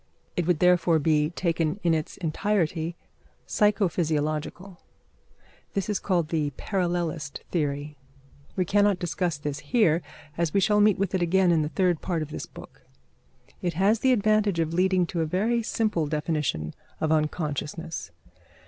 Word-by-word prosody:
It 175 -3 -1
would 180 -3 +3
therefore 175 -1 +4
be, 150 0 +2
taken 170 0 -1
in 170 -1 +3
its 155 -1 -2
entirety, 170 -2 -1 0.5
psycho 210 -1 +2
physiological. 160 +3 -2 0.9
This 195 +1 -1
is 210 - 0
called 175 -5 0
the 155 -3 0
parallelist 175 -6 -2
theory. 145 -2 -2 0.6
We 185 - +1
cannot 205 +1 +3
discuss 175 -2 -2
this 145 0 -4
here, 165 +1 +2 0.4
as 170 -1 0
we - - +5
shall 210 +1 +3
meet 210 -2 +5
with 195 -1 -1
it 185 - +1
again 180 +1 +3
in 165 -2 +3
the 150 - -1
third 175 +1 +1
part 170 -4 -1
of 155 - -9
this - - -5
book. - - -13 0.8
It 175 -1 -1
has 200 +5 +3
the 260 - +3
advantage 215 -5 +2
of 165 0 0
leading 185 0 +3
to 170 0 -3
a - - +1
very 220 +8 +1
simple 215 -8 0
definition 150 - -1 0.3
of 155 - 0
unconsciousness. 155 - -2
170 Hz, 155 wpm, -26 LUFS, 155-190 Hz, 0.9 s, we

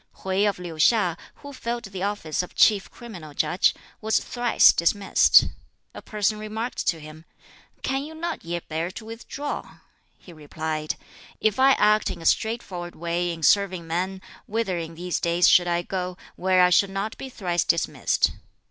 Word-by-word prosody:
Hwķi 190 +2 +2
of 200 - -4
Liu 175 -2 -7
hiŠ, 180 +1 +3 0.2
who 285 0 -11
filled 235 -2 -4
the 195 -3 -7
office 195 -6 -2
of 180 - -10
Chief 205 -3 +4
Criminal 175 -11 -11
Judge, 180 - +2 0.3
was 220 0 +2
thrice 240 -1 +4
dismissed. 195 +4 +4 0.5
A - - -9
person 210 0 -1
remarked 220 +3 -4
to 165 - +1
him, 155 +1 -12 0.6
"Can 270 +1 -1
you 315 +2 -9
not 340 +1 -4
yet 170 0 -5
bear 165 +2 -2
to 220 +4 -9
withdraw?" 240 +6 -6 0.4
He 175 - -15
replied, 155 0 -4 0.4
"If 215 +2 +1
I 270 +1 +6
act 210 -1 +3
in - - -6
a 165 - -10
straightforward 190 -7 -1
way 170 +1 -2
in 165 -1 -7
serving 185 -2 +3
men, 185 +3 -3 0.2
whither 205 -5 -1
in 165 0 -7
these 175 +1 -3
days 170 +1 +3
should 175 -1 +5
I 175 0 0
go, 180 -1 -4 0.2
where 185 0 +3
I 180 - +4
should 195 +2 +4
not 195 +3 -3
be 270 - -6
thrice 175 -8 -1
dismissed? 170 - +1
185 Hz, 170 wpm, -24 LUFS, 170-220 Hz, 0.6 s, I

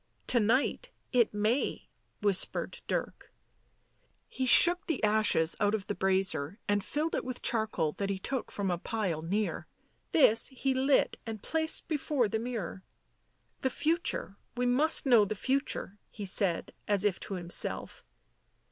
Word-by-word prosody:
" - - -40
To 240 - +5
night 255 - +1 0.2
it 240 -3 +3
may," 215 +6 -1 0.4
whispered 200 -2 0
Dirk. - - -4 1.0
He 260 - -3
shook 350 +8 +5
the 320 -9 -2
ashes 210 -6 +2
out 205 +1 +2
of 200 -3 -5
the 205 - -2
brazier 190 -4 0
and 205 -1 +1
filled 310 +3 -2
it - - -1
with 255 -1 -6
charcoal 215 -9 0
that 200 -1 -1
he 195 - -1
took 255 +6 -4
from 195 -2 -2
a 175 - -2
pile 190 -7 -2
near. 200 +6 -2 0.4
This 230 -7 +5
he 265 0 -1
lit 265 +2 +2
and 220 -2 -6
placed 320 0 +1
before 290 -5 0
the 220 +2 -2
mirror. 225 -6 -5 0.4
" - - -43
The 260 - +1
future 315 - -1
— - - -35
we 250 - +1
must 275 +7 +2
know 240 -5 +6
the 205 +1 -2
future," 260 -4 -2
he 210 - -7
said, 190 -2 +1
as 205 -1 +3
if 200 -3 +1
to 195 - -6
himself. 175 -1 -2
220 Hz, 160 wpm, -30 LUFS, 195-260 Hz, 1.0 s, know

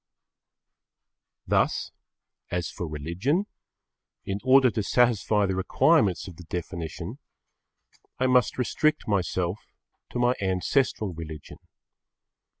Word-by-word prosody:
Thus, - - +1 0.6
as 90 -1 -2
for 85 - -5
religion, 85 - -1 0.8
in 100 +1 -2
order 130 -1 +6
to 110 - -1
satisfy 110 -2 +2
the 95 -1 -1
requirements 95 -1 +2
of 90 -4 -10
the 90 - -10
definition, 85 -1 -5 1.0
I 130 - +1
must 125 -1 +3
restrict 155 +5 +1
myself 95 -2 0 0.5
to - - -5
my 120 0 +3
ancestral 95 +2 0
religion. 80 -2 -9
100 Hz, 100 wpm, -26 LUFS, 85-125 Hz, 1.0 s, order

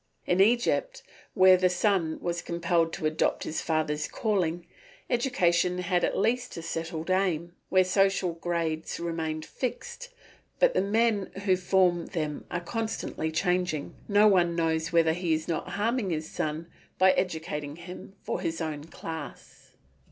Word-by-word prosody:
In 180 +2 +3
Egypt, 240 - +2 0.3
where 185 0 +7
the 185 0 +3
son 180 -3 +1
was 175 0 -2
compelled 170 -1 0
to 170 - -4
adopt 155 +1 +1
his 155 - -3
father's 155 -2 -1
calling, 175 -6 -1 0.5
education 180 -8 +2
had 180 0 0
at - - +1
least 245 +3 0
a 165 - -6
settled 165 +1 -4
aim; 175 -3 0 0.2
where 185 0 +5
social 190 -1 +2
grades 165 -2 -2
remain 160 -2 -3
fixed, 485 - -5 0.5
but - - +4
the - - +2
men 210 0 +1 0.2
who 190 -2 +4
form 180 -2 +2
them 155 -4 -3
are 175 - -3
constantly 220 -5 -3
changing, 180 -2 0
no 205 +1 +5
one 175 -4 +3
knows 160 -1 0
whether 165 -1 +4
he 170 -2 0
is 160 0 -5
not 165 - -2
harming 230 -1 0
his 155 -2 -2
son 155 +1 -3 0.3
by 190 0 +6
educating 160 -5 -2
him 180 +3 -10
for - - -3
his 165 -2 -2
own 155 -3 -4
class. 160 -3 -9
175 Hz, 150 wpm, -28 LUFS, 160-195 Hz, 0.5 s, where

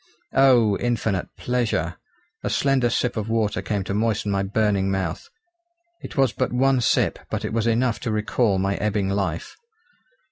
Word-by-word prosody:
Oh! 120 -7 +4
infinite 110 -6 -1
pleasure! 110 -9 -1 0.4
a - - -2
slender 135 -3 +2
sip 125 +1 0
of 110 0 -3
water 110 -2 0
came 100 -3 -2
to 100 - -4
moisten 105 -1 0
my 100 0 +1
burning 100 -1 +1
mouth. 95 -4 -3 0.7
It - - -9
was 135 -4 +4
but 130 - -1
one 130 +1 +2
sip - - +1
but - - -3
it - - -4
was 115 0 0
enough 115 +1 +1
to 120 - -3
recall 105 -1 +1
my 95 +1 0
ebbing 100 -1 0
life. 100 - -2
110 Hz, 165 wpm, -23 LUFS, 100-125 Hz, 0.7 s, Oh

